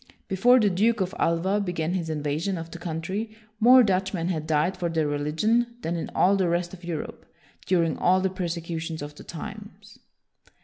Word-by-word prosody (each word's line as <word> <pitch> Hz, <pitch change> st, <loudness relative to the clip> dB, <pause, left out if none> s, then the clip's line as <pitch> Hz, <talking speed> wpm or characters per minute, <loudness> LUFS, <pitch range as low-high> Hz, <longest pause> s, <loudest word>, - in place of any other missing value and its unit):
Be 190 Hz, -, -2 dB
fore 245 Hz, +7 st, +6 dB
the 210 Hz, -3 st, +3 dB
Duke 220 Hz, +5 st, +2 dB
of 190 Hz, +1 st, -1 dB
Alva 180 Hz, +5 st, +1 dB
began 175 Hz, -4 st, -2 dB
his 170 Hz, -3 st, -2 dB
invasion 155 Hz, +5 st, -2 dB
of 165 Hz, 0 st, -7 dB
the 170 Hz, -, -8 dB
country, 185 Hz, +7 st, -4 dB, 0.2 s
more 250 Hz, +3 st, +8 dB
Dutchmen 190 Hz, -3 st, 0 dB
had 155 Hz, -4 st, -2 dB
died 160 Hz, +4 st, +1 dB
for 175 Hz, -2 st, -2 dB
their 160 Hz, -2 st, 0 dB
religion 210 Hz, +12 st, 0 dB
than 170 Hz, +1 st, -1 dB
in 165 Hz, -, -4 dB
all 195 Hz, +2 st, +4 dB
the 190 Hz, -3 st, +1 dB
rest 175 Hz, +1 st, -1 dB
of 180 Hz, -1 st, -11 dB
Europe 170 Hz, -3 st, -5 dB, 0.4 s
during 170 Hz, -3 st, +2 dB
all 185 Hz, +1 st, +4 dB
the 190 Hz, 0 st, 0 dB
persecutions 165 Hz, -3 st, -4 dB
of 145 Hz, 0 st, -7 dB
the -, -, -12 dB
times. 205 Hz, +5 st, -10 dB
180 Hz, 185 wpm, -26 LUFS, 165-195 Hz, 0.4 s, more